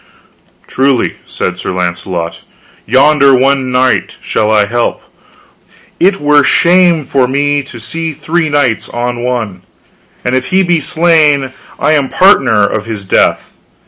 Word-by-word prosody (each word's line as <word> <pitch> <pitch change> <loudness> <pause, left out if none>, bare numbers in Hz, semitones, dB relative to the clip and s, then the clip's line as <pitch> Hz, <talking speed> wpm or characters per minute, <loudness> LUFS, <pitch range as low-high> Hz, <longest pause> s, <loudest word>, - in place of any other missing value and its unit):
Truly, 135 -2 0
said 90 0 -4
Sir - - -4
Launcelot, 85 -1 -4 0.5
yonder 140 +2 +4
one 135 0 +1
knight 125 0 0
shall 110 -1 -1
I 105 -1 +3
help, 120 +4 -2
for - - -31 0.9
it 195 +2 +2
were 145 0 +3
shame 170 -1 +3
for 130 -2 +1
me 145 +2 0
to 130 -3 -12
see 165 +8 -4
three 155 +2 -2
knights 145 -6 0
on 120 0 -4
one, 115 -7 -3 0.6
and 125 - -1
if 130 0 -1
he 190 +1 +2
be 175 -2 +1
slain 150 -4 +1 0.3
I - - +1
am 145 -3 +1
partner 130 - +3
of 105 +1 -3
his 105 -3 -6
death. - - 0
135 Hz, 145 wpm, -12 LUFS, 115-150 Hz, 0.9 s, yonder